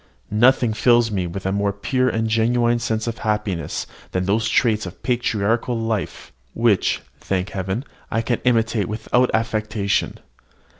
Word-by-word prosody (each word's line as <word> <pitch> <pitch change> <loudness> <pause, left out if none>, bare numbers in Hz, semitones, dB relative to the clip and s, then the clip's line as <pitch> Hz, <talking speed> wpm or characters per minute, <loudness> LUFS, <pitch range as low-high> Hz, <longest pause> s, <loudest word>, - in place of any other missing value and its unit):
Nothing 120 +1 +4
fills 120 0 +3
me 95 -3 -1
with 90 +3 -6
a 95 - +1
more 100 0 +1
pure 130 +6 0
and 115 -1 -1
genuine 120 +2 +2
sense 110 -2 -1
of 115 0 -4
happiness 105 -5 -2 0.3
than 90 0 0
those 110 +3 +1
traits 110 -4 +2
of 90 - -11
patriarchal 120 -1 0
life 110 -4 -3 0.2
which, 115 -5 +2 0.2
thank 95 0 -2
Heaven! 95 +7 -3 0.2
I 115 - 0
can 120 0 -1
imitate 115 -4 +2
without 120 +3 +1
affectation. 110 -2 0
110 Hz, 145 wpm, -21 LUFS, 100-120 Hz, 0.3 s, Nothing